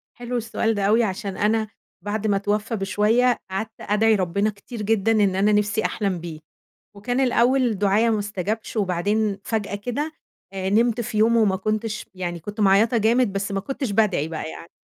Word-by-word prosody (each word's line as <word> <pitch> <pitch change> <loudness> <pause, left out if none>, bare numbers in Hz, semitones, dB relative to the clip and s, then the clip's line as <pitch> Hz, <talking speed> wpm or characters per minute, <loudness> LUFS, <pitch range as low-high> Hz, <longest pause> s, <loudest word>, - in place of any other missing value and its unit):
حلو 245 0 -4
السؤال 225 0 -1
ده 200 -2 -2
أوي، 225 +3 +4
عشان 195 -1 -3
أنا 215 +1 +1 0.4
بعد 215 +1 -2
ما 205 - +2
اتوّفى 210 +3 -1
بشويّة 215 +5 +2
قعدْت 215 +4 -3
أدعِي 215 +2 +3
ربنا 200 +2 0
كتير 210 +3 -9
جدًا 220 +1 +1
إن 200 -4 +3
أنا 200 +2 +3
نفْسي 210 +1 +1
أحلم 195 -4 -1
بيه. 165 -2 -7 0.6
وكان 245 +6 -2
الأول 245 -3 +2
دُعايا 210 +3 +3
ما 220 - +1
أُستجبش 205 +2 -4
وبعدين 205 +2 0
فجأة 210 -3 -2
كده 250 +9 -3 0.4
آآ، 190 0 -3
نِمت 230 +2 +2
في 215 -2 -3
يوم 230 +2 +4
وما 205 -4 +3
كنتش، 215 +2 -3
يعني 175 -2 -4
كنت 205 +5 -7
معيّطة 205 +4 +4
جامد 225 0 +2
بس 200 +1 -3
ما 195 - -1
كنتش 270 +1 -4
بادعِي 200 -7 +1
بقى 160 -1 -5
يعني 165 - -10
210 Hz, 180 wpm, -23 LUFS, 195-225 Hz, 0.6 s, أوي